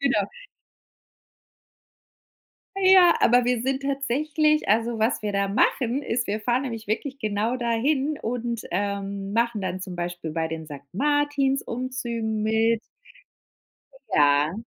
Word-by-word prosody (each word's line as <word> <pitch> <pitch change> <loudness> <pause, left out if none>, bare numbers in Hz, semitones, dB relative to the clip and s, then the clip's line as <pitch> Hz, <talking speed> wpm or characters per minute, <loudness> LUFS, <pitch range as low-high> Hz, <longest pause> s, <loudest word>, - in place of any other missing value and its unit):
genau. 255 -8 +1 2.5
Ja, 375 -2 +7
aber 245 +1 +4
wir 245 -2 +1
sind 265 +1 -1
tatsächlich 295 +3 0
also, 225 +2 +1
was 220 +1 +1
wir 210 -1 -2
da 200 0 0
machen, 245 +6 +1
ist, 235 -2 -1
wir 210 +2 -2
fahren 240 +4 +1
nämlich 230 -4 -5
wirklich 265 +6 -3
genau 215 +1 -1
dahin 265 +5 0
und, 235 -1 -3
ähm, 200 +1 -3
machen 230 -2 0
dann 185 0 -3
zum 185 -1 -7
Beispiel 175 -2 -4
bei 165 0 -1
den 160 -1 -6
Sankt 140 -2 -11
Martins-Umzügen 255 -4 -1
mit. 225 +1 +2 1.3
Ja. 145 +2 +4
230 Hz, 125 wpm, -25 LUFS, 200-265 Hz, 2.5 s, Ja